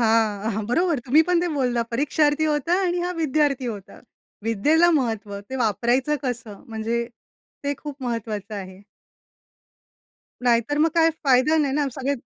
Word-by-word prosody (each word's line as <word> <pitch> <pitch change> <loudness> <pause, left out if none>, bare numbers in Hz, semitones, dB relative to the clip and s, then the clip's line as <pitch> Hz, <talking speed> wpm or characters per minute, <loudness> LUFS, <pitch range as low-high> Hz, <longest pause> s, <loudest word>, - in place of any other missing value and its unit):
हां, 220 -2 +2
हां. 215 +1 -3
बरोबर 335 +1 +2
तुम्ही 305 +5 +6
पण 350 -1 +3
ते 350 - 0
बोलला. 245 -3 +1
परीक्षार्थी 295 +3 +2
होता 295 +4 0
आणि 350 0 0
हा 360 - -2
विद्यार्थी 285 -3 +1
होता. 195 -2 -13 0.4
विद्येला 300 +11 +3
महत्व. 220 -4 -3
ते 265 - -3
वापरायचं 240 +8 +1
कसं 230 -5 -5
म्हणजे 230 +1 -2 0.6
ते 285 0 0
खूप 290 -3 -8
महत्वाचं 220 -3 -4
आहे. 190 -1 -8 1.6
नाहीतर 240 +4 +2
मग 320 +1 +3
काय 330 -1 +5
फायदा 265 +4 +4
नाही 280 -3 +1
ना 290 -1 +1
सगळे 270 +1 -1
255 Hz, 145 wpm, -23 LUFS, 225-300 Hz, 1.6 s, तुम्ही